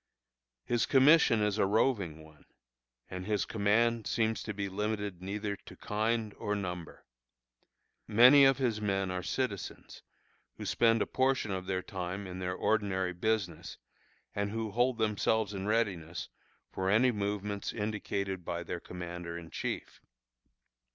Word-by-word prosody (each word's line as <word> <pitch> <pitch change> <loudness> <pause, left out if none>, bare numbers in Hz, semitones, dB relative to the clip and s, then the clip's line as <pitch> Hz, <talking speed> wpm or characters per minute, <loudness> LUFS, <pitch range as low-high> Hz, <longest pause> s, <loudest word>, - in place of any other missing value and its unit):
His 120 -1 +1
commission 135 -5 +6
is 105 0 0
a 95 - +4
roving 100 - +1
one, 80 -1 -18 0.6
and 90 +1 -6
his 105 -1 +1
command 115 +2 +1
seems 110 -1 0
to 110 - -4
be 100 -1 -3
limited 105 -1 -3
neither 100 +2 -3
to - - -14
kind 110 0 -1
or 105 - -1
number. 90 -4 -6 1.0
Many 125 +6 +8
of 135 -1 +5
his 120 -5 0
men 95 -2 0
are 90 0 -2
citizens, 100 -2 -4 0.6
who - - -6
spend 115 -1 +3
a - - -4
portion 130 -5 +1
of 95 -1 -4
their 95 -1 -1
time 95 +1 -5
in 90 0 -7
their 90 0 -2
ordinary 95 -4 0
business, 90 -4 -2 0.6
and 100 0 -1
who 110 0 -3
hold 120 +2 +2
themselves 110 -1 +1
in 95 0 -4
readiness 95 -7 -1 0.4
for 95 0 -1
any 120 +5 +4
movements 100 -1 -2
indicated 100 -3 -3
by 85 +1 -3
their 85 +1 -4
commander 85 -1 -6
in 85 -1 -10
chief. - - -4
105 Hz, 145 wpm, -31 LUFS, 95-110 Hz, 1.0 s, Many